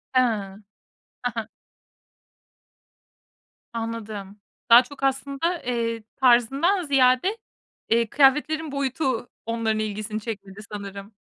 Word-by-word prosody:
Hıı, 255 - +7 1.0
hı - - +1
hı. - - -6 2.2
Anladım. 215 -3 -5 0.3
Daha 235 +2 +9
çok 275 +2 -12
aslında, 280 +5 0
eee, 230 -2 -2
tarzından 270 - +3
ziyade, 275 - +3 0.5
eee, 230 0 +3
kıyafetlerin 295 +4 +3
boyutu 265 -3 -1 0.2
onların 225 -1 0
ilgisini 215 0 -3
çekmedi 200 -3 -7
sanırım. 200 0 -7
240 Hz, 90 wpm, -24 LUFS, 215-275 Hz, 2.2 s, Daha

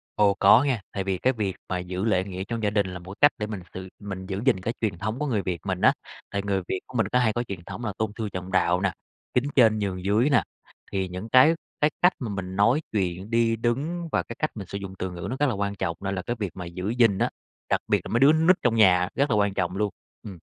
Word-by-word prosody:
Ồ, 100 -1 +4
có 105 +6 +6
nha, 130 -7 0
tại 100 - -3
vì 95 -1 -1
cái 130 +8 +2
việc 105 -5 -2
mà 90 - -1
giữ 90 +3 -3
lễ 95 -4 +2
nghĩa 95 -1 -5
trong 115 +2 -4
gia 105 - +3
đình 100 -2 +1
là 90 -1 -6
một 90 +1 -12
cái 145 +7 +6
cách - - -34
để 105 - -3
mình 105 -3 -5
sự 95 0 -7
mình 95 -2 -6
giữ 95 +1 -4
gìn 100 -9 +3
cái 115 +5 -2
truyền 105 -6 -1
thống 110 +6 -3
của 150 - -1
người 110 -7 0
Việt 90 -3 -3
mình - - -2
á, - - +6 0.4
tại 100 - -2
người 100 -1 0
Việt 95 - -1
của 125 - -6
mình 110 - +2
có 125 - +3
hay 115 -3 +2
có 120 - -1
truyền 95 -7 -7
thống 120 - -6
là 105 - -2
tôn 110 -1 -1
sư 110 -2 -3
trọng 90 +1 -5
đạo 90 +1 +2
nè, 95 -1 +1 0.4
kính 125 - +2
trên 110 -4 +5
nhường 95 -3 -3
dưới 110 +8 +3
nè. 140 - +4 0.5
Thì 95 -1 -1
những 90 +5 -7
cái 130 +7 +7 0.3
cái 150 - +5
cách 180 +1 +6
mà 120 - -4
mình 95 -2 -5
nói 115 +9 +3
chuyện, 95 -1 -2
đi 115 0 +2
đứng 140 +10 -2
và - - +1
cái 115 - -8
cách - - 0
mình 100 -4 -6
sử 100 - -5
dụng 95 -1 -7
từ 95 - -3
ngữ 85 -1 -6
nó 130 - -2
rất 145 - +3
là - - 0
quan 100 0 -2
trọng 85 -5 -3
nên 95 0 -3
là 90 - -2
cái 120 - -3
việc 100 -5 -2
mà 90 - -6
giữ 90 +3 -4
gìn 115 -4 +3
á, - - +1 0.4
đặc - - +2
biệt - - +2
là - - -6
mấy 115 - +3
đứa 135 - +7
con 160 +1 +2
nít 185 - +7
trong 120 -2 +2
nhà 90 -4 +5
rất 140 +2 +2
là 115 - +2
quan 100 -1 +2
trọng 90 -1 -1
luôn. 105 0 +1 0.3
Ừm. 95 -3 -8
100 Hz, 295 wpm, -25 LUFS, 95-115 Hz, 0.5 s, cái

